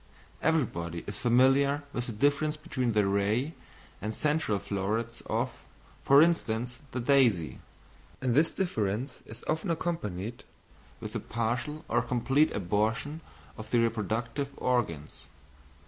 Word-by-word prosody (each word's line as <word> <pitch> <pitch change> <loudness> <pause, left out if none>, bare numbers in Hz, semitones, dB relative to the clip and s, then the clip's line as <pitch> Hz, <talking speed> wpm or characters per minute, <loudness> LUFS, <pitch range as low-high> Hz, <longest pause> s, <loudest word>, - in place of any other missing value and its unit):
Everyone 110 - 0
is 100 - -6
familiar 135 +4 +4
with 120 0 -2
the - - -3
difference 145 +6 +1
between 130 -7 -1
the 105 -1 +3
ray 105 +9 +1 0.5
and 105 +2 -3
central 150 -8 +1
florets 100 +4 -2
of, - - -2 0.4
for 140 +2 +7
instance, 125 -7 0
the 125 - -2
daisy, 120 - +3 0.6
and 130 -2 0
this 155 +6 +4
difference 120 - -2
is 110 - -9
often 160 +4 -1
accompanied 120 - -3 0.6
with - - -7
the - - -1
partial 120 +7 -2
or - - +2
complete 135 +5 +2
abortion 110 - -1 0.4
of 110 - -8
the 120 - +3
reproductive 115 +4 -1
organs. 95 - -1
120 Hz, 125 wpm, -29 LUFS, 105-145 Hz, 0.6 s, for